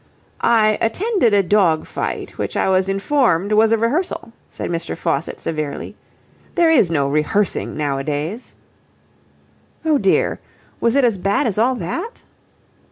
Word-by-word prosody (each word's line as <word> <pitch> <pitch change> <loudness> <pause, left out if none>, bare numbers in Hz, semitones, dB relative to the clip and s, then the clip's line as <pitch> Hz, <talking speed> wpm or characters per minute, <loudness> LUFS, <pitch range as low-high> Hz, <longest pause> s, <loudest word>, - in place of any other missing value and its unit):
"I 215 -2 +3
attended 360 - +1
a 200 - +4
dog 180 -5 +2
fight - - -5
which - - -3
I - - +1
was 190 0 +2
informed 195 - +1
was 220 +1 +4
a 225 - +4
rehearsal," 230 - -2 0.2
said - - -5
Mr. 170 0 -3
Faucitt 140 +4 -2
severely. 155 -3 -4 0.6
"There 340 -2 +4
is 255 - +4
no 145 -4 +1
rehearsing 155 +9 0
nowadays." 150 - -3 1.3
"Oh 305 -3 +3
dear! 195 -2 +1 0.4
Was 235 +2 +1
it 280 - +4
as 230 -6 +2
bad 200 +9 +1
as 215 -3 -1
all 250 +3 +3
that?" 460 - -5
205 Hz, 140 wpm, -19 LUFS, 165-240 Hz, 1.3 s, a